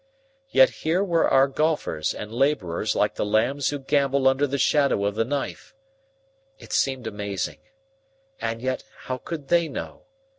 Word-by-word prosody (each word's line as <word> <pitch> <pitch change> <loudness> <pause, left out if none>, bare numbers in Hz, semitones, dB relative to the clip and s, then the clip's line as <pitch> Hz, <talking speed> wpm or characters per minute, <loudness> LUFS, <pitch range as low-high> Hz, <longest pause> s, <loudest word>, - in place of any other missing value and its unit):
Yet - - +6
here 170 +5 +1
were 170 -4 +2
our 135 +1 +5
golfers 150 - -1
and 105 +1 -7
laborers 120 - 0
like - - +2
the - - -2
lambs 120 +7 +1
who 145 - -2
gambol 140 -1 +1
under 135 +2 +3
the 140 +1 -2
shadow 140 -6 +2
of 100 - 0
the 110 +2 +1
knife. 140 - -4 0.8
It - - -10
seemed 130 -3 0
amazing. 100 -3 -4 0.8
And 115 +1 -3
yet 130 0 -2 0.2
how 130 0 -4
could 150 -3 -7
they 170 -1 +3
know? - - -7
135 Hz, 155 wpm, -24 LUFS, 115-145 Hz, 0.8 s, Yet